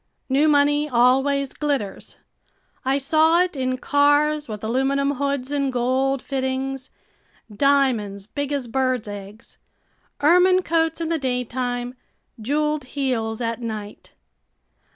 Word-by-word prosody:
New 280 +4 +3
money 290 0 +3
always 270 +3 +2
glitters. 275 -10 -3 0.7
I 265 +1 +1
saw 315 +5 +3
it 365 -3 -5
in 255 -1 -1
cars 290 +1 +2
with 210 -1 -6
aluminum 270 +4 +1
hoods 280 -1 -2
and 280 -2 0
gold 260 +2 0
fittings, 265 0 -3 0.7
diamonds 235 -7 +1
big 285 +5 -4
as 275 -4 -2
birds' 255 -2 -1
eggs, 205 +1 -10 0.6
ermine 360 +4 +4
coats 325 -1 0
in 325 - -2
the 330 -1 0
daytime 250 -1 -2 0.5
jeweled 300 +3 -1
heels 250 -5 -2
at 230 0 -3
night. 215 -3 -7
270 Hz, 115 wpm, -22 LUFS, 245-290 Hz, 0.7 s, ermine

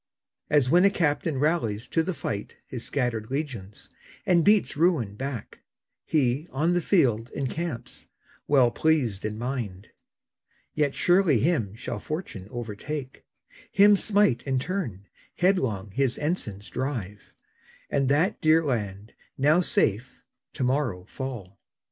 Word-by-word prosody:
As 145 -4 +4
when 175 +2 +6
a 200 - +7
captain 160 -5 0
rallies 130 -9 0
to 165 - +2
the 170 +2 -3
fight 105 -7 -5
His 125 -3 -6
scattered 120 -5 -2
legions, 125 -9 -5 0.4
and 175 -2 +4
beats 210 +2 +3
ruin 150 - +2
back, 130 -2 -6 0.5
He, 140 +1 +1
on 155 +6 +1
the 175 - +1
field, 125 - +2
encamps, 140 0 -4 0.4
well 130 -4 +4
pleased 130 -12 +1
in 105 0 -3
mind. 115 -5 -4 0.8
Yet 145 -2 0
surely 175 -6 +4
him 120 - 0
shall 115 - -5
fortune 155 - -6
overtake, 120 +5 -6 0.5
Him 205 +1 +6
smite 200 - +2
in 135 -1 -1
turn, 130 - -3 0.3
headlong 125 - +1
his 130 +3 0
ensigns 115 - -3
drive; 115 -7 -4 0.6
And 135 -2 0
that 160 +9 +2
dear 160 +1 +4
land, 105 -5 -3 0.2
now 150 +6 +4
safe, 120 - 0 0.3
to - - -3
morrow 125 -9 0
fall. 110 -6 -7
135 Hz, 130 wpm, -26 LUFS, 110-160 Hz, 0.8 s, a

